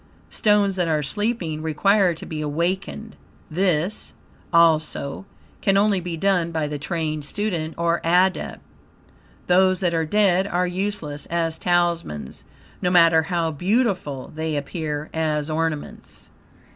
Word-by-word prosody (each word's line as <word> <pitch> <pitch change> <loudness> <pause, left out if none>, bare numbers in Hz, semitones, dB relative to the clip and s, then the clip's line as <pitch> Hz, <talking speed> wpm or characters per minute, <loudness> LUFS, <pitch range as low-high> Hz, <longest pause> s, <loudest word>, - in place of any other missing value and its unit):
Stones 205 -3 +2
that 175 -2 +1
are 155 -2 +1
sleeping 180 - -2
require 180 +4 +2
to - - -9
be 155 -1 -5
awakened. 185 +8 -3 0.4
This, 180 +2 0 0.4
also, 160 0 +2 0.3
can 195 -1 +3
only 200 -1 +3
be 175 -2 -5
done 180 -2 +1
by 160 -2 -1
the 150 0 -4
trained 155 0 -3
student 165 -2 -3
or 170 0 +1
Adept. 180 +3 +1 0.8
Those 185 +1 +4
that 175 -2 +1
are 165 -1 +1
dead, 195 0 +3
are 180 -1 0
USELESS 180 -6 -3
as 165 -1 -1
Talismans, 170 - -1 0.4
no 180 - +1
matter 165 -2 +6
how 165 0 -1
beautiful 180 - -1
they 155 -1 -2
appear 150 0 -4
as 155 -1 -1
ornaments. 160 -1 -4
170 Hz, 130 wpm, -23 LUFS, 155-190 Hz, 0.8 s, matter